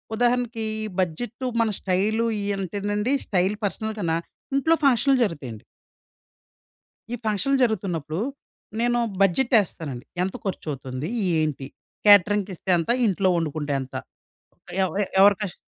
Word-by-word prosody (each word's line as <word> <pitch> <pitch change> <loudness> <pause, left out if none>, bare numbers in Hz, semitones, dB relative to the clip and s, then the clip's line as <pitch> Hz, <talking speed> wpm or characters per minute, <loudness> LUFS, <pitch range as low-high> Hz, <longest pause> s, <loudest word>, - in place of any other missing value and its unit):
ఉదాహరణకి, 240 -1 +1 0.2
ఈ - - -2 0.2
బడ్జెట్టు, 230 +9 -3 0.2
మన 225 - +2
స్టైలు 210 +5 +1
ఇయ్యంటేనండి, 205 +3 -1
స్టైలు 190 +2 +1
పర్సనల్ 220 +3 -3
కన్నా, 165 -4 0 0.4
ఇంట్లో 320 +4 +3
ఫంక్షనులు 270 0 +4
జరుగుతయండి. 135 - -4 1.5
ఈ - - +1
ఫంక్షన్లు 220 +6 +1
జరుగుతున్నప్పుడు, 175 -8 -1 0.6
నేను 240 +1 +2 0.2
బడ్జెటేస్తానండి. 190 - +1 0.2
ఎంత 190 - -2
ఖర్చు 190 -4 -4
అవుతుంది? 130 +1 -5 0.3
ఏంటి? 145 -3 -2 0.4
కేటరింగ్‌కిస్తే 205 -2 +4
ఎంత? 165 - -3 0.2
ఇంట్లో 195 -2 +2
ఒండుకుంటే 150 -2 -2
ఎంత? 130 0 -9 0.9
ఎవయే 195 +2 0
ఎవరి 200 +1 +7
కష్ 200 -4 -3
200 Hz, 110 wpm, -24 LUFS, 165-225 Hz, 1.5 s, ఎవరి